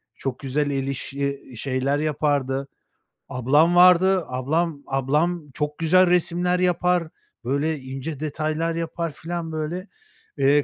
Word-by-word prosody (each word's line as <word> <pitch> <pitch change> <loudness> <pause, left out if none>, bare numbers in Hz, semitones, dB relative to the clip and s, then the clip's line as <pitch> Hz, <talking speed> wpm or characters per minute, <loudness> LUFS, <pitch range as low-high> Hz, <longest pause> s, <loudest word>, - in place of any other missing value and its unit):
çok 130 -2 -4
güzel 145 +2 -1
el 135 -1 -2
işi 140 +1 -3 0.2
şeyler 135 +3 0
yapardı. 140 -3 0 0.6
Ablam 145 +7 +3
vardı, 180 +1 +6
ablam 145 +4 -1
ablam 150 +4 0
çok 150 0 -3
güzel 180 +3 +4
resimler 180 +1 +2
yapar, 180 -1 +2 0.4
böyle, 140 +4 -1
ince 135 +3 -6
detaylar 155 +2 -2
yapar 165 0 -3
filan, 165 +2 -5
böyle, 160 +5 -4 0.5
eee, 140 +1 +4
155 Hz, 120 wpm, -23 LUFS, 140-170 Hz, 0.6 s, vardı